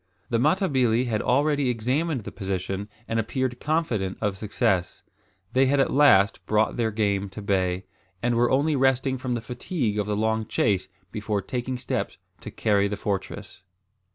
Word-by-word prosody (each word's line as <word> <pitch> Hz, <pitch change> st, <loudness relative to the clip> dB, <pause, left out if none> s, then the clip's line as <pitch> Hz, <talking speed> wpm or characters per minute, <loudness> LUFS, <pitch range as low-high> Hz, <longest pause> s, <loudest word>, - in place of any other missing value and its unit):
The 115 Hz, -, +2 dB
Matabili 130 Hz, -, +2 dB
had 110 Hz, -3 st, -1 dB
already 145 Hz, +1 st, +2 dB
examined 130 Hz, +4 st, -1 dB
the -, -, -7 dB
position 95 Hz, +1 st, -4 dB, 0.2 s
and 115 Hz, -, 0 dB
appeared 125 Hz, +2 st, -2 dB
confident 125 Hz, -, -1 dB
of 105 Hz, -2 st, -1 dB
success. 95 Hz, -3 st, -1 dB, 0.5 s
They 130 Hz, +1 st, +4 dB
had 140 Hz, +1 st, +2 dB
at 135 Hz, -, +2 dB
last 115 Hz, -8 st, +5 dB
brought 110 Hz, 0 st, +2 dB
their 115 Hz, -2 st, +1 dB
game 100 Hz, -2 st, 0 dB
to 95 Hz, -, -9 dB
bay, 95 Hz, -2 st, 0 dB, 0.3 s
and 120 Hz, +3 st, 0 dB
were 120 Hz, +1 st, +3 dB
only 145 Hz, +3 st, +2 dB
resting 130 Hz, 0 st, +2 dB
from 125 Hz, -1 st, -2 dB
the 120 Hz, -, -3 dB
fatigue 120 Hz, -, -2 dB
of 105 Hz, -, -1 dB
the 105 Hz, -1 st, -1 dB
long 110 Hz, 0 st, 0 dB
chase 95 Hz, -3 st, +1 dB, 0.2 s
before 105 Hz, -1 st, -2 dB
taking 125 Hz, 0 st, -3 dB
steps -, -, -3 dB, 0.2 s
to -, -, -8 dB
"carry 100 Hz, -2 st, +1 dB
the 105 Hz, 0 st, -4 dB
fortress." 100 Hz, 0 st, -4 dB
115 Hz, 165 wpm, -25 LUFS, 100-130 Hz, 0.5 s, last